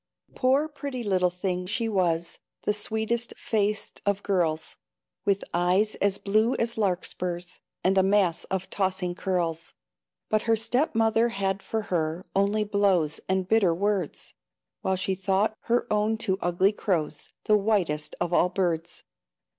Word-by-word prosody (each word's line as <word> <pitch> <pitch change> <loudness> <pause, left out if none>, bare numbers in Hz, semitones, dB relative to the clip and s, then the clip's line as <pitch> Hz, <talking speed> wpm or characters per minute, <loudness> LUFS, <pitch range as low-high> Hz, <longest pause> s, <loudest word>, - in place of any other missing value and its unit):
Poor, 270 +4 +2
pretty 280 -4 -5
little 185 -3 +2
thing 180 0 -3
she 225 +4 -1
was, 175 -5 0 0.2
The 210 - +1
sweetest 220 +2 -2
faced 210 -1 -1
of 200 0 0
girls, 165 -5 0 0.5
With 200 -1 +1
eyes 180 +5 +2
as 200 -1 +1
blue 215 +4 +2
as 230 0 -1
larkspurs, 180 -3 -2 0.2
And 190 +1 +4
a - - +6
mass 190 -3 +2
of 190 -1 -3
tossing 190 -2 -1
curls; 175 -3 -2 0.5
But 215 0 +2
her 225 - +6
step 235 +7 0
mother 225 +1 +3
had 195 -3 -1
for 220 +1 -3
her 165 +1 -1
Only 200 +2 +2
blows 195 -7 +1
and 190 -1 +1
bitter 195 -6 +3
words, 200 -3 -2 0.5
While 190 - +1
she 185 +1 0
thought 195 +3 +1
her 240 +1 +2
own 210 +1 +1
two 195 -4 -1
ugly 175 +3 +3
crows, 165 -8 -2
The 215 - +4
whitest 195 -8 0
of 175 0 -1
all 175 +1 +4
birds. 175 -3 -2
195 Hz, 145 wpm, -26 LUFS, 180-215 Hz, 0.5 s, a